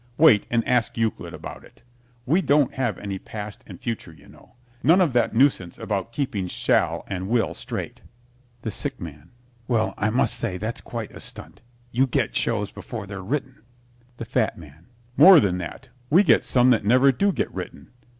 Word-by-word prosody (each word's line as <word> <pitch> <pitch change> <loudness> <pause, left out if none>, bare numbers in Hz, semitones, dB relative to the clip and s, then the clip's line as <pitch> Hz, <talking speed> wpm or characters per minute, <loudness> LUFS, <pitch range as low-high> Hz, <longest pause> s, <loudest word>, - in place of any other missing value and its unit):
Wait 145 -10 +6
and 115 -1 0
ask 125 -2 +1
Euclid 115 -1 -2
about - - -9
it. - - -20 0.4
We 165 +9 +3
don't 145 -5 +3
have 120 -7 -1
any 100 -2 -5
past 105 +5 -8
and - - -10
future, 115 -7 -5
you 80 -3 -18
know. - - -19 0.3
None 165 +7 +5
of 170 -8 +2
that 120 - +1
nuisance 115 -9 +2
about 100 +1 -3
keeping 115 -8 -2
shall - - +1
and 95 0 -5
will 115 -1 +1
straight. - - -6 0.6
THE 110 - -3
SICK - - -4
MAN 75 0 -9 0.4
Well, 115 -3 +1
I 105 - +1
must 120 +4 +1
say 100 -6 -3
that's 110 +5 -4
quite 115 -3 -6
a - - -10
stunt. - - -9 0.3
You 130 +3 +2
get 125 - -1
shows 105 -3 -1
before 110 -4 -7
they're 100 -1 -7
written. 130 +5 -4 0.6
THE 115 - -6
FAT - - 0
MAN 80 +2 -15 0.3
More 175 +4 +9
than 90 -7 0
that. 95 +9 -8 0.2
We 180 +7 +6
get - - +4
some 125 0 +4
that 115 -3 +2
never 130 +6 +5
do 200 +10 +1
get - - -3
written. - - -8
115 Hz, 185 wpm, -24 LUFS, 100-130 Hz, 0.6 s, More